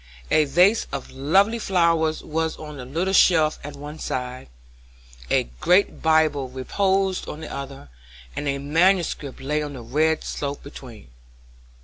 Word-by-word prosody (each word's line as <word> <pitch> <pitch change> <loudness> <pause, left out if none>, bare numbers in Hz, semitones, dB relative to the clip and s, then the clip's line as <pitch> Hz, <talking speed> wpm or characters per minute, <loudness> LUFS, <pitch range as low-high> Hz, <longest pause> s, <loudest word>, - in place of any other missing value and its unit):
A 155 - +4
vase 180 +10 +3
of 140 -1 -6
lovely 190 - +2
flowers 170 -5 +1
was 160 +1 -2
on 150 -1 -9
the 125 - -7
little 170 +9 -2
shelf 160 -5 +4
at 145 0 -7
one 150 +2 -9
side, 125 - -5 0.8
a - - +3 0.2
great 185 +3 +2
Bible 155 -4 +2
reposed 190 +9 0
on 150 - -7
the 160 - -7
other, 135 - -8 0.5
and 145 - -3
a 140 0 0
manuscript 160 -1 +1
lay 150 +3 -1
on 145 -1 -5
the 125 -3 -8
red 155 +6 +1
slope 140 0 -4
between. 125 - -12
150 Hz, 145 wpm, -23 LUFS, 140-170 Hz, 0.8 s, A